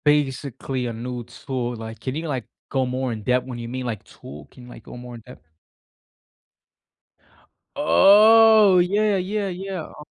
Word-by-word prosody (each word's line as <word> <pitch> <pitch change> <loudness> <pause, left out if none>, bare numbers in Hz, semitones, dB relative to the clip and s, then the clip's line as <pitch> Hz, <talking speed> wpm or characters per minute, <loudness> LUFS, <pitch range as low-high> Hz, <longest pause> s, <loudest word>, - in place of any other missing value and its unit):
Basically 135 -3 -1
a 120 - -4
new 120 +1 -6
tool, 120 0 -5
like, 110 0 -9
can 130 0 -5
you, 160 +2 -4
like, 130 -6 -3 0.2
go 135 -1 0
more 130 0 -3
in-depth 125 +3 -1
when 125 -2 -7
you 115 - -6
mean, 130 +1 -5
like, 110 -5 -5
tool? 75 +2 -13
Can 125 - -16
you, 125 - -13
like, - - -13
go - - -11
more 120 0 -10
in-depth? 115 -6 -15 2.3
Oh! 210 - +6
Yeah, 205 +4 +1
yeah, 200 +2 -2
yeah, 190 -1 -5
uh 150 - -12
130 Hz, 160 wpm, -22 LUFS, 120-180 Hz, 2.3 s, Oh